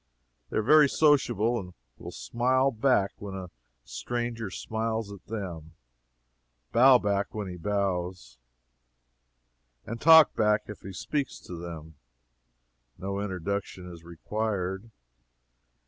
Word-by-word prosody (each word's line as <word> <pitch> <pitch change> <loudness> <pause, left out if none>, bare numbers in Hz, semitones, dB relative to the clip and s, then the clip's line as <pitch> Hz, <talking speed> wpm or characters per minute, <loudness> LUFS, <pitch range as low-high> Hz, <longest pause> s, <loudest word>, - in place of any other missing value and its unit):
They - - -3
are 110 - +1
very 150 +4 +6
sociable, 120 -7 +2
and 90 -3 -9 0.3
will - - -8
smile 125 - +1
back 110 -4 +2
when 100 -2 -7
a 95 -2 -7 0.3
stranger 120 - -4
smiles 110 +1 -3
at 100 - -11
them, 85 -7 -6 1.0
bow 130 +2 +7
back 100 -2 -1
when 105 -2 -3
he 90 - -6
bows, 90 -5 -3 1.5
and 115 +1 -6
talk 160 -1 +8
back 105 -1 +2
if 105 - -10
he 95 - -8
speaks 140 +9 -3
to - - -10
them. 80 -3 -9 1.0
No 100 +1 -4
introduction 95 -1 -4
is 85 -1 -13
required. 95 +3 -3
100 Hz, 115 wpm, -28 LUFS, 90-115 Hz, 1.5 s, talk